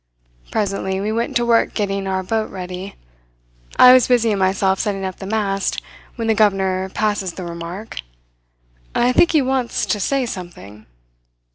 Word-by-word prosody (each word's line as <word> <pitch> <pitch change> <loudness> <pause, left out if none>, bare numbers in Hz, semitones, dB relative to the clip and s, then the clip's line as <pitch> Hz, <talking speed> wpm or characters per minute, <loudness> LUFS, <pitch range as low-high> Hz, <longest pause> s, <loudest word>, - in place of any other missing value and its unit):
Presently 195 -2 -1
we 205 +2 -2
went 230 +2 -2
to 240 - +2
work 230 -1 +2
getting 195 -2 -2
our 190 0 -1
boat 220 +3 -1
ready. 185 +1 -7 0.8
I 250 0 +9
was 255 -2 +5
busying 230 -5 +2
myself 190 0 +1
setting 195 -2 -2
up 185 -1 -5
the 195 - -8
mast, 200 -2 -1 0.4
when 230 -2 -3
the 225 - +4
governor 190 -3 +1
passes 205 -3 -1
the 185 - -7
remark: 170 +5 -7 1.0
"'I 245 +1 +3
think 340 +6 +4
he 305 -3 +4
wants 260 -2 -1
to 210 - -1
say 270 +6 0
something.' 170 - -9
200 Hz, 155 wpm, -20 LUFS, 190-225 Hz, 1.0 s, I